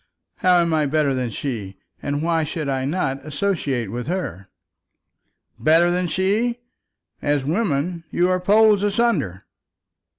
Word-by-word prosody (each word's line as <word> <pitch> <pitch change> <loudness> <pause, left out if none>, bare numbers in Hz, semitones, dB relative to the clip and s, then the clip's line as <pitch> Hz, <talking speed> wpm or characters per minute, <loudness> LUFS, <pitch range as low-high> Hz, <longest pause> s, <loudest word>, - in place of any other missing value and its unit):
How 180 -1 +4
am 170 -1 0
I 155 -2 +2
better 150 -1 +1
than 130 -2 -1
her, 110 -6 -5 0.3
and 145 +1 -2
why 165 -1 +1
should 155 0 -4
I 135 -1 -1
not 135 -3 -2
associate 145 - -2
with 120 +3 -5
her?" 125 - -4 1.1
"Better 165 +3 +4
than 180 0 0
her! 205 +7 +1 0.7
As 145 -2 0
women 170 -1 -1
you 175 - +2
are 185 0 +1
poles 210 +2 +4
asunder." 205 - 0
160 Hz, 135 wpm, -22 LUFS, 135-185 Hz, 1.1 s, How